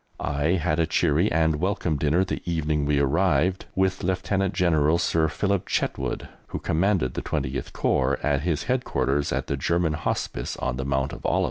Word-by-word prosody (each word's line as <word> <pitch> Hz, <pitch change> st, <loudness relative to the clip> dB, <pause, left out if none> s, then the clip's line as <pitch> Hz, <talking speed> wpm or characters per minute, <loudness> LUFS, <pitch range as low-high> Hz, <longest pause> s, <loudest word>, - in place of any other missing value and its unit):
I 75 Hz, +3 st, 0 dB
had 85 Hz, -3 st, 0 dB
a 80 Hz, -, +2 dB
cheery 80 Hz, +4 st, +2 dB
and 80 Hz, -1 st, +2 dB
welcome 90 Hz, -3 st, -1 dB
dinner 75 Hz, +6 st, +2 dB
the -, -, -4 dB
evening 75 Hz, -3 st, -1 dB
we 75 Hz, -1 st, +2 dB
arrived 80 Hz, +4 st, +1 dB
with 95 Hz, 0 st, +1 dB
Lieutenant 95 Hz, +1 st, 0 dB
General 80 Hz, -3 st, +3 dB
Sir 80 Hz, -2 st, +2 dB
Philip 100 Hz, +4 st, -1 dB
Chetwode, -, -, -2 dB, 0.2 s
who -, -, -5 dB
commanded 85 Hz, -6 st, +1 dB
the -, -, -3 dB
20th 65 Hz, +2 st, -3 dB
Corps, 65 Hz, +1 st, +1 dB
at 70 Hz, -2 st, +1 dB
his 80 Hz, -2 st, -1 dB
headquarters 75 Hz, -, 0 dB
at -, -, -1 dB
the 70 Hz, -, -2 dB
German 85 Hz, +3 st, +1 dB
Hospice 75 Hz, -, -3 dB
on 65 Hz, -1 st, -2 dB
the 65 Hz, -, -3 dB
Mount 65 Hz, -1 st, -1 dB
of -, -, -9 dB
Olives. -, -, +1 dB
80 Hz, 175 wpm, -25 LUFS, 70-90 Hz, 0.2 s, General